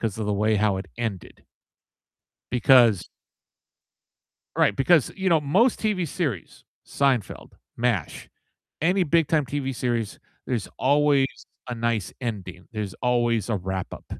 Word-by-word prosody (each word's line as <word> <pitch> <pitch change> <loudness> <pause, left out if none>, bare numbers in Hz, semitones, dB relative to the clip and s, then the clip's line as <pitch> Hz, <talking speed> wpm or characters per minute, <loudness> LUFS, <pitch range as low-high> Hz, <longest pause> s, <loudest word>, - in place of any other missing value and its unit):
'cause 110 -2 -2
of 110 - -2
the 105 - 0
way 105 +1 +2
how 105 -1 +2
it 95 - -6
ended. 110 -6 -5 1.1
Because 120 -5 +5 1.5
Right, 100 - +3
because, 145 - +3
you 190 -1 0
know, 165 -2 +4
most 195 - +2
TV 205 -6 0
series- 135 - -4 0.2
Seinfeld, 135 -6 -1 0.2
MASH, 115 -6 -2 0.5
any 180 +3 +3
big-time 160 -2 +2
TV 135 0 -3
series- 120 -4 -2 0.3
there's 120 -6 -2
always 140 0 +3 0.4
a 120 - -3
nice 115 -4 -1
ending, 100 -6 -6
there's 105 -4 -4
always 120 -3 +1
a 110 - +1
wrap-up, 95 0 -5
120 Hz, 125 wpm, -24 LUFS, 105-145 Hz, 1.5 s, Because